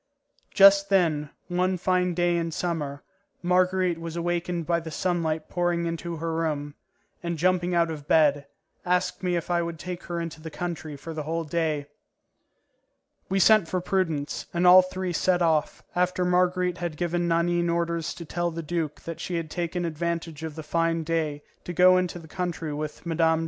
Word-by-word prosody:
Just 195 0 +7
then, 160 -7 +2 0.2
one 180 +1 0
fine 180 0 +1
day 175 0 +2
in 170 -1 -1
summer, 155 -4 -3 0.4
Marguerite 180 -1 +2
was 165 0 -6
awakened 175 0 -2
by 170 +1 +1
the 165 -1 -7
sunlight 160 -1 -1
pouring 175 -1 0
into 170 0 -3
her 165 +1 -3
room, 150 -3 -2 0.5
and, 170 -1 -3
jumping 180 +1 +1
out 170 -1 +2
of 150 -2 -8
bed, 145 -3 +3 0.4
asked 180 0 0
me 180 -1 0
if 170 +1 -3
I 175 0 +2
would 170 -1 -4
take 180 +2 -6
her 175 -1 -3
into 165 -2 -5
the 160 - -6
country 160 -2 -5
for 165 +4 -7
the 155 - -4
whole 165 +2 -2
day. 155 -2 -1 1.4
We 195 - +1
sent 215 -2 +6
for 185 - -1
Prudence, 170 -6 -1
and 175 +1 +2
all 180 +1 +10
three 185 0 -4
set 180 +2 +2
off, 160 -3 +1
after 180 0 +1
Marguerite 180 0 +1
had 170 -3 -4
given 175 +1 0
Nanine 170 +1 +1
orders 170 -1 -1
to 170 - -8
tell 175 +2 -1
the 165 0 -5
duke 160 -2 -3
that 165 -1 -7
she 180 - -4
had 165 -2 -3
taken 175 0 -2
advantage 165 -1 -3
of 160 -2 -5
the 160 - -6
fine 165 +1 0
day 155 -2 -1 0.2
to 175 - -5
go 185 +1 +6
into 180 -1 -1
the 165 -2 -11
country 170 -3 -3
with 150 +2 -5
Mme. 165 -1 +2
170 Hz, 180 wpm, -26 LUFS, 160-180 Hz, 1.4 s, all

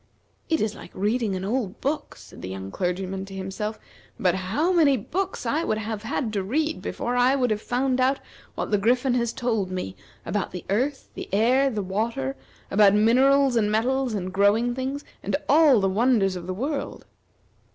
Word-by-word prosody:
"It 320 -1 +2
is 215 -1 0
like - - -11
reading 210 +1 0
an 185 +1 -4
old 215 -3 -2
book," 295 +3 -2
said 105 -4 -14
the 90 - -6
young 95 0 -6
clergyman 190 - -2
to 195 0 -10
himself; 195 +3 -4 0.4
"but 180 -3 +3
how 195 - 0
many 295 -6 +4
books 365 - -3
I 295 +8 0
would 215 - 0
have 220 -1 -4
had 225 +1 -2
to 200 - 0
read 305 +11 -1
before 245 +1 -3
I 250 +2 +4
would 250 -4 +1
have 210 0 -1
found 255 +2 0
out 265 +2 +2 0.4
what - - -3
the 205 - +3
Griffin 245 +4 +2
has 235 -2 +1
told 225 -7 -1
me 180 - -4 0.3
about 195 +2 -1
the 180 - -6
earth, 265 +7 -1
the - - -7
air, 250 +7 +3
the 215 -5 -3
water, 190 - -2 0.4
about 200 0 +5
minerals, 260 +5 +4
and 210 -2 +2
metals, 250 +2 +1
and 185 -2 -4
growing 205 +5 +3
things, 265 +3 -4 0.2
and - - -1
all 300 -6 +6
the 195 - +2
wonders 205 -1 +2
of 175 -1 -7
the 185 - -2
world!" 275 +7 -4
220 Hz, 190 wpm, -25 LUFS, 195-260 Hz, 0.4 s, all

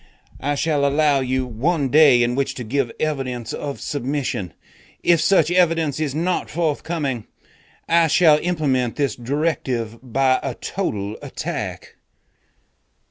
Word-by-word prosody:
I 145 +1 -1
shall 145 -1 0
allow 145 0 +3
you 130 0 -1
one 135 +5 -1
day 140 -4 +6
in 120 +1 0
which 135 +1 -1
to 125 - -5
give 125 +1 -1
evidence 130 -6 -2
of 140 -1 -5
submission. 135 - -3 0.5
If 170 -2 +4
such 175 -5 +3
evidence 165 -5 +2
is 150 -3 -2
not 175 +3 -1
forthcoming, 150 -6 -2 0.6
I 170 0 +4
shall 155 -1 +5
implement 140 -9 0
this 140 -6 0
directive 125 -4 -2
by 130 +1 +1
a 135 -3 -4
total 105 - -3
attack....'" - - -5
140 Hz, 130 wpm, -21 LUFS, 125-155 Hz, 0.6 s, day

